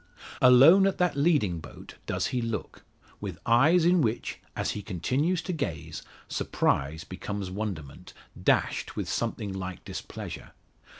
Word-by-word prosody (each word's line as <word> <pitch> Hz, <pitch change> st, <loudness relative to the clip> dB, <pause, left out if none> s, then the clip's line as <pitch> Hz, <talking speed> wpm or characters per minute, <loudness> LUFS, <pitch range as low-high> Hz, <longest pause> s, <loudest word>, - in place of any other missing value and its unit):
Alone 140 Hz, +10 st, +8 dB
at 195 Hz, -, -1 dB
that 180 Hz, -4 st, +1 dB
leading 140 Hz, -, +2 dB
boat 80 Hz, -, -12 dB
does -, -, -1 dB
he 125 Hz, -, +1 dB
look; 115 Hz, -2 st, -5 dB, 0.4 s
with -, -, -5 dB
eyes 155 Hz, +9 st, +5 dB
in 175 Hz, 0 st, +4 dB
which, 115 Hz, -3 st, -2 dB, 0.2 s
as -, -, -1 dB
he 105 Hz, -, -5 dB
continues 130 Hz, -, -1 dB
to 185 Hz, -, -3 dB
gaze, 85 Hz, -, -4 dB, 0.3 s
surprise 80 Hz, +4 st, 0 dB
becomes 100 Hz, -2 st, -5 dB
wonderment, 95 Hz, -9 st, -6 dB, 0.3 s
dashed -, -, +1 dB
with -, -, -3 dB
something 100 Hz, -2 st, -2 dB
like 95 Hz, -2 st, -6 dB
displeasure. -, -, -7 dB
115 Hz, 135 wpm, -28 LUFS, -, 0.4 s, Alone